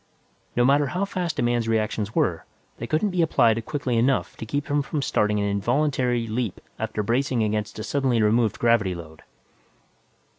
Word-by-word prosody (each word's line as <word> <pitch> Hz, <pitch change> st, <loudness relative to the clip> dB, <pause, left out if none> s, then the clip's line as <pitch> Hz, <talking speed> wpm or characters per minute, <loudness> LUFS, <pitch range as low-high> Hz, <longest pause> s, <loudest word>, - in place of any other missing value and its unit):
No 120 Hz, -, +3 dB
matter 140 Hz, +2 st, +4 dB
how 180 Hz, +9 st, -1 dB
fast 180 Hz, -5 st, -3 dB
a -, -, +1 dB
man's 120 Hz, -1 st, +1 dB
reactions 110 Hz, -1 st, -1 dB
were, -, -, +1 dB, 0.4 s
they 115 Hz, -, -4 dB
couldn't 160 Hz, -, +1 dB
be 180 Hz, -1 st, +1 dB
applied 115 Hz, -8 st, +3 dB
quickly 130 Hz, -5 st, -1 dB
enough 130 Hz, +3 st, +1 dB
to 110 Hz, -, -7 dB
keep 145 Hz, +5 st, -2 dB
him 145 Hz, -2 st, +1 dB
from 140 Hz, +1 st, -3 dB
starting 105 Hz, -5 st, +1 dB
an 100 Hz, -, 0 dB
involuntary 120 Hz, +3 st, 0 dB
leap 110 Hz, -2 st, -3 dB, 0.2 s
after 110 Hz, -1 st, -2 dB
bracing 125 Hz, +1 st, +1 dB
against 105 Hz, -1 st, -2 dB
a 110 Hz, -, -4 dB
suddenly 130 Hz, -3 st, +1 dB
removed 110 Hz, 0 st, +2 dB
gravity 115 Hz, -6 st, +2 dB
load. 80 Hz, -2 st, -11 dB
120 Hz, 175 wpm, -24 LUFS, 110-140 Hz, 0.4 s, matter